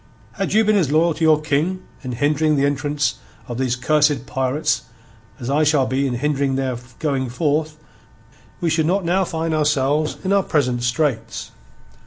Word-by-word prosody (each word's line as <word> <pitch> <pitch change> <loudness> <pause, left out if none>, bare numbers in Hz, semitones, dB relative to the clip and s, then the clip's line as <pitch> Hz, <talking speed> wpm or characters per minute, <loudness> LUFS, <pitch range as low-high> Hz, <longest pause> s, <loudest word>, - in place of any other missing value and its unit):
"Had 195 +5 -3
you 220 +1 +4
been 215 0 +3
as 160 -8 +1
loyal 165 +2 +3
to 165 - -4
your 155 -1 +5
King 155 +5 -1 0.2
in 130 -2 -5
hindering 150 +4 +1
the 140 0 +2
entrance 145 -1 -1 0.3
of 120 0 -5
these 130 -2 0
cursed 145 +1 +2
pirates 135 +5 0 0.6
as 120 - -6
I 145 +3 +2
shall 145 -3 +3
be 130 +2 0
in 125 - -2
hindering 140 0 0
their 130 -2 -1 0.2
going 135 -4 -1
forth 150 +4 0
again, 150 0 -27 0.8
we 170 - +1
should 160 0 +1
not 190 +1 +1
now 185 +3 +2
find 165 -1 -2
ourselves 150 0 +1
in 190 +1 +1
our 200 - +4
present 125 -9 0
straits. 120 -3 -1
150 Hz, 180 wpm, -21 LUFS, 130-160 Hz, 0.8 s, your